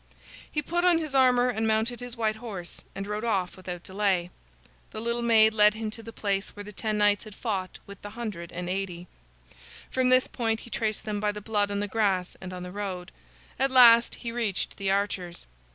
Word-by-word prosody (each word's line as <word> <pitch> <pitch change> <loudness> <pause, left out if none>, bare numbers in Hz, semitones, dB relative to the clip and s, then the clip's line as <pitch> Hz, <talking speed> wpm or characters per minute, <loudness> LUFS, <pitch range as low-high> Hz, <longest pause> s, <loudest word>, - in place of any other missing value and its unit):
He 300 - -1
put 345 +4 -1
on 355 -2 +5
his 310 -4 -3
armor 250 -2 +5
and 225 -2 -1
mounted 220 +2 +1
his 245 -1 -8
white 220 -1 0
horse 200 -7 -7
and 195 - -4
rode 210 +1 -3
off 195 -6 0
without 180 -2 -7
delay. 190 -3 0 0.6
The - - -7
little 235 +1 -1
maid 220 -2 +5
led 210 -1 +5
him 220 -1 -4
to 225 - -6
the 230 0 -9
place 200 -3 -2
where 205 - -7
the 210 - -9
ten 215 +1 -2
knights 205 +1 +3
had 215 -2 -11
fought 195 -6 -3
with 200 -1 -12
the 205 - -7
hundred 205 -7 -6
and 180 0 -5
eighty. 180 -2 -3 0.9
From 260 -1 +2
this 255 0 +5
point 225 -2 -1
he 235 - -12
traced 215 -2 -2
them 210 -1 -2
by 210 0 +1
the 210 - -7
blood 205 -1 0
on 200 0 -2
the 205 - -1
grass 195 -4 0
and 185 - -7
on 180 -1 -6
the 180 - -7
road. 190 -2 -5 0.5
At 270 - +3
last 235 -3 +7
he 235 - -5
reached 230 -5 -2
the 195 -1 -1
archers. 195 -3 -1
210 Hz, 215 wpm, -27 LUFS, 195-235 Hz, 0.9 s, last